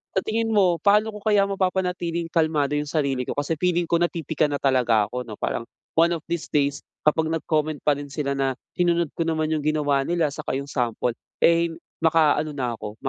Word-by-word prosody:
sa - - +4
tingin 225 +1 -1
mo, 190 -5 +4
paano 210 +2 +4
ko - - -7
kaya 205 -2 +4
mapapanatiling 180 -3 -1
kalmado 155 -3 +1
iyung 150 0 -1
sarili 140 -5 0
ko? - - -2
Kasi, 145 +3 -1
feeling 175 -2 +1
ko 170 - +2
napipika 160 -3 0
na 145 - -1
talaga 120 -6 +3
ako, 125 0 -4
ano. 105 - -7
Parang, 115 - -2 0.4
one 170 +1 +5
of - - -4
these 170 -2 -3
days, 145 -1 +1 0.3
kapag 160 +1 +3
nag-comment 155 -2 -1
pa 150 - +5
rin 145 0 -7
sila. 140 -1 -2
Na 135 -1 0 0.2
sinunod 170 -3 +2
ko - - -3
naman 155 -1 0
iyung 155 - 0
ginawa 145 -3 +2
nila, 170 -2 +1
saka 150 -4 -4
iyong 140 +1 -5
sample, 120 -1 -1 0.3
eh, 170 0 +4 0.3
maka-ano 155 -1 +3
na 125 -3 -2
ako, 105 -1 -8
155 Hz, 195 wpm, -24 LUFS, 140-170 Hz, 0.4 s, one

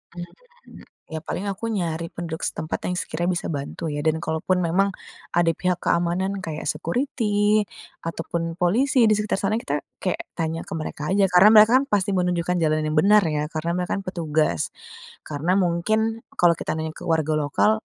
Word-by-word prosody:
Mmm, - - -12 0.3
ya 160 - -3
paling 200 - -3
aku 195 +4 -6
nyari 170 -5 -2
penduduk 165 -2 -6
setempat, 160 -1 -3
yang 180 - -1
sekiranya 175 +3 -2
bisa - - -3
bantu 145 +3 -4
ya, 145 - -3
dan 160 +1 +1
kalaupun 160 +3 0
memang 190 +4 +2 0.4
ada 170 -1 +4
pihak 180 -1 -1
keamanan 180 +3 0
kayak 155 -3 -5
security 210 - +1 0.4
ataupun 165 0 -3
polisi 235 +7 +3
di 215 - +5
sekitar 210 -2 -1
sana, 200 +2 0
kita 145 -9 -2 0.2
kayak 185 - -1 0.2
tanya 165 -1 -2
ke - - -6
mereka 155 -1 -5
aja, 195 0 +4
karena 180 +4 +8
mereka 215 +1 +8
kan - - -1
pasti 200 -5 +1
mau 185 -2 +1
menunjukkan 180 0 0
jalan 155 0 +1
yang 155 - -1
benar 210 +4 +5
ya, 150 -1 -1
karena 160 +1 -2
mereka 180 0 -2
kan - - -8
petugas. 155 - 0 0.7
Karena 155 +4 -1
mungkin, 220 +6 0 0.2
kalau 175 -1 +6
kita - - -2
nanya 160 0 -3
ke - - -10
warga 160 -2 +1
lokal, 145 +8 +2
175 Hz, 180 wpm, -23 LUFS, 160-200 Hz, 0.7 s, karena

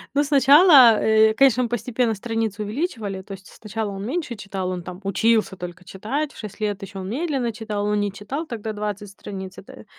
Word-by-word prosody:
Ну, 290 - +4
сначала, 280 - +7
э, 220 0 +4
конечно, 255 0 +4
мы 240 - -2
постепенно 240 0 -1
страницы 220 -1 -3
увеличивали, 215 - -3
то 195 +1 -10
есть 195 0 -12
сначала 215 0 -5
он 195 0 -6
меньше 285 -1 -3
читал, 195 -3 -5
он 180 -1 -4
там 180 +1 -8
учился 215 +1 +1
только 180 0 -8
читать, 265 +12 -4
в - - -17
6 215 -1 -9
лет 205 -1 -2
ещё 195 0 -8
он 185 - -6
медленно 270 -2 -1
читал, 215 -2 -4
он 210 0 +1
не 205 -1 -1
читал 210 - -5
тогда 220 -3 -5
20 205 -1 -5
страниц, 190 -1 -9
это 200 - -13
215 Hz, 200 wpm, -22 LUFS, 200-245 Hz, -, сначала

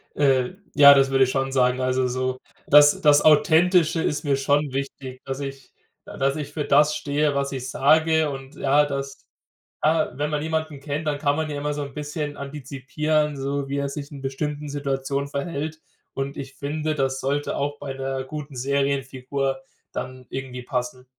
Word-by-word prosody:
Äh, 135 +1 +2 0.2
ja, 140 -1 +10
das 135 -1 +3
würde 135 0 +5
ich 130 - +1
schon 135 0 -1
sagen. 125 -1 +2
Also 130 0 +1
so, 130 +1 -2 0.3
das 145 0 +7
das 145 -1 +6
Authentische 170 0 +4
ist 150 - -1
mir 140 -1 +2
schon 145 +1 +1
wichtig, 135 -1 -5
dass 135 0 -5
ich 135 -1 -7 0.4
äh, - - -9
dass 135 +1 +1
ich 150 -2 -5
für 150 -1 -3
das 150 +2 +4
stehe, 145 0 0
was 140 0 -1
ich 130 -1 -4
sage 155 +4 +3
und 135 -1 -8
ja, 145 +2 +3
dass 140 -1 -5 0.6
ja, 155 +1 +2
wenn 150 +1 -1
man 150 -1 -1
jemanden 160 -2 -2
kennt, 145 +2 -4
dann 145 -1 0
kann 145 0 +1
man 160 0 -2
ja 145 - -4
immer 150 +1 -2
so 145 - -4
'n 140 -1 -8
bisschen 150 0 -4
antizipieren, 150 +2 -2
so 140 +1 -3
wie 140 +1 -3
er 140 0 -1
sich 140 +1 -7
in 140 -2 -9
bestimmten 145 +2 -4
Situationen 140 -1 -2
verhält. 155 +2 -4 0.3
Und 135 +1 -4
ich 135 0 -7
finde, 155 +2 -2
das 135 -2 0
sollte 140 +2 -1
auch 145 +1 -2
bei 140 -2 -5
'ner 135 0 -3
guten 145 +1 -7
Serienfigur 135 0 -1 0.3
dann 130 -1 -6
irgendwie 130 -1 -6
passen. 125 +1 -4
140 Hz, 185 wpm, -24 LUFS, 135-150 Hz, 0.6 s, ja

